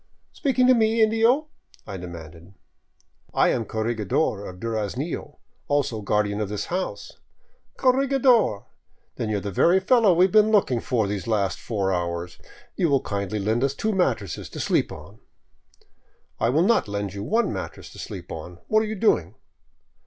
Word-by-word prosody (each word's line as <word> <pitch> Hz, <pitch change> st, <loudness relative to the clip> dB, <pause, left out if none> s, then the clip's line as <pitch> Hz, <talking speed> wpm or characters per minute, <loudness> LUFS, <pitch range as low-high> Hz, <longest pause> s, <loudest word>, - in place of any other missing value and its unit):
" -, -, -46 dB
Speaking 260 Hz, -2 st, +1 dB
to 255 Hz, -, +7 dB
me, 225 Hz, -1 st, +2 dB
indio? 225 Hz, +7 st, +3 dB, 0.2 s
" -, -, -28 dB
I -, -, -5 dB
demanded. 85 Hz, 0 st, -10 dB, 0.4 s
" -, -, -36 dB
I -, -, +5 dB
am 115 Hz, -, 0 dB
corregidor 110 Hz, 0 st, -1 dB
of 90 Hz, 0 st, -10 dB
Duraznillo, 115 Hz, -, -4 dB, 0.3 s
also 140 Hz, -6 st, 0 dB
guardian 105 Hz, 0 st, 0 dB
of 105 Hz, -, -2 dB
this 105 Hz, 0 st, -3 dB
house." 185 Hz, +1 st, -4 dB, 0.3 s
" -, -, -41 dB
Corregidor! 255 Hz, -, +3 dB, 0.5 s
Then 110 Hz, -, -2 dB
you 105 Hz, -, 0 dB
are -, -, -3 dB
the 100 Hz, -, -4 dB
very 175 Hz, -, +4 dB
fellow 220 Hz, +1 st, +4 dB
we 180 Hz, +2 st, +6 dB
have 190 Hz, -, -1 dB
been 215 Hz, 0 st, +5 dB
looking 190 Hz, -, +3 dB
for 115 Hz, -2 st, 0 dB
these 100 Hz, +1 st, -4 dB
last 100 Hz, -4 st, 0 dB
four 100 Hz, -4 st, -1 dB
hours. 85 Hz, 0 st, -3 dB, 0.4 s
You 175 Hz, -4 st, +1 dB
will 140 Hz, -2 st, +3 dB
kindly 100 Hz, 0 st, -3 dB
lend 110 Hz, +5 st, 0 dB
us 140 Hz, 0 st, 0 dB
two 220 Hz, +8 st, -1 dB
mattresses 120 Hz, -, -1 dB
to -, -, -8 dB
sleep -, -, +1 dB
on.'* -, -, -11 dB, 0.6 s
" -, -, -41 dB
I 115 Hz, -, +2 dB
will 150 Hz, +7 st, +3 dB
not 220 Hz, -, +3 dB
lend 100 Hz, -1 st, -3 dB
you 100 Hz, -, -6 dB
one 225 Hz, -, 0 dB
mattress -, -, -7 dB
to -, -, -12 dB
sleep 90 Hz, -2 st, -8 dB
on. 85 Hz, +2 st, -8 dB
What 215 Hz, -, +4 dB
are 220 Hz, -, -2 dB
you 220 Hz, -, -3 dB
doing?" 110 Hz, -, +1 dB
115 Hz, 180 wpm, -24 LUFS, -, 0.6 s, to